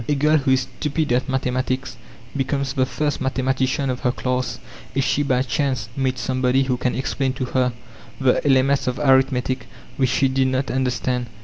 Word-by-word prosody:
A 145 - +3
girl 150 +2 +3
who 140 -2 -1
is 130 0 +4
stupid 150 +2 -2
at 125 +3 +1
mathematics 130 0 -1 0.4
becomes 135 0 -1
the 130 -2 +1
first 145 +1 -2
mathematician 130 +1 0
of 125 - -4
her 125 - +1
class 125 0 -2 0.4
if 135 - +1
she 145 - +1
by 130 -3 +1
chance 130 -2 -1
meets 130 -2 -1
somebody 130 +1 +1
who 130 -1 0
can 125 0 -1
explain 135 0 -1
to 130 - -3
her 125 0 +1 0.5
the 130 -2 +2
elements 135 0 +3
of 125 0 -1
arithmetic 130 -2 +2 0.3
which 130 -2 +2
she 130 +2 +2
did 130 0 +1
not 130 +1 -1
understand. 125 -1 -1
130 Hz, 180 wpm, -22 LUFS, 130-135 Hz, 0.5 s, is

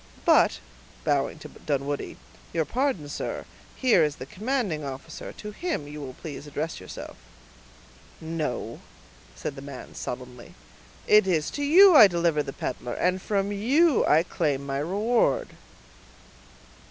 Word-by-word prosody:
But," - - +5 0.5
bowing - - 0
to - - -10
Dunwoodie, 145 0 -3 0.4
"your 160 -2 +1
pardon, 250 - -1
sir; 145 - -4 0.3
here 235 -10 +4
is 150 -1 0
the 130 - -8
commanding 205 - -2
officer; 135 -1 -7
to 210 - -8
him 305 - -3
you 150 +1 -8
will 130 -2 -7
please 150 -1 -8
address 155 +3 -4
yourself." 95 - -9 1.0
"No," 160 -1 -4 0.6
said 140 - -5
the 135 - -8
man, 140 -2 -9
sullenly, 125 -1 -7 0.5
"it 210 -2 +5
is 160 -5 +1
to 290 - -5
you 360 +5 +8
I 220 -7 +10
deliver 170 -4 +1
the 135 - -5
peddler, 125 -2 -5
and 185 +1 0
from 200 0 -1
you 265 +9 +3
I 155 +2 +5
claim 145 -6 -1
my 135 0 -2
reward." 225 - +1
165 Hz, 140 wpm, -26 LUFS, 145-215 Hz, 1.0 s, I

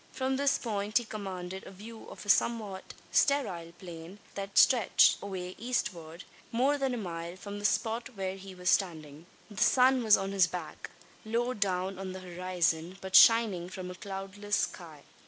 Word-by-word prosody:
From 265 0 -1
this 280 +1 +2
point 210 -2 -1
he 240 - +1
commanded 190 -3 -6
a - - -10
view 220 +4 -11
of - - -10
a - - -13
somewhat 210 -4 0 0.2
sterile 185 -13 +1
plain; 175 +1 -10 0.2
that 195 0 -6
stretched 240 -7 +5
away 185 -2 -5
eastward, 180 -8 -3 0.3
more 270 +5 +2
than 265 -2 0
a - - -4
mile, 170 -4 -5
from 200 +2 -8
the 205 - -5
spot 230 +3 0
where 190 -1 -3
he 195 -1 -11
was 180 0 +1
standing. 160 -4 -1 0.2
The 200 - -6
sun 255 0 +4
was 215 -2 +6
on 195 0 -3
his 190 -3 +4
back, 180 0 -7 0.3
low 235 +3 -1
down 190 -3 -1
on 190 -1 -5
the 190 - -7
horizon, 175 -1 -1
but 190 0 -4
shining 205 -5 +6
from 185 -1 -7
a - - -6
cloudless 195 +2 -4
sky. 160 -5 -4
195 Hz, 175 wpm, -30 LUFS, 180-220 Hz, 0.3 s, was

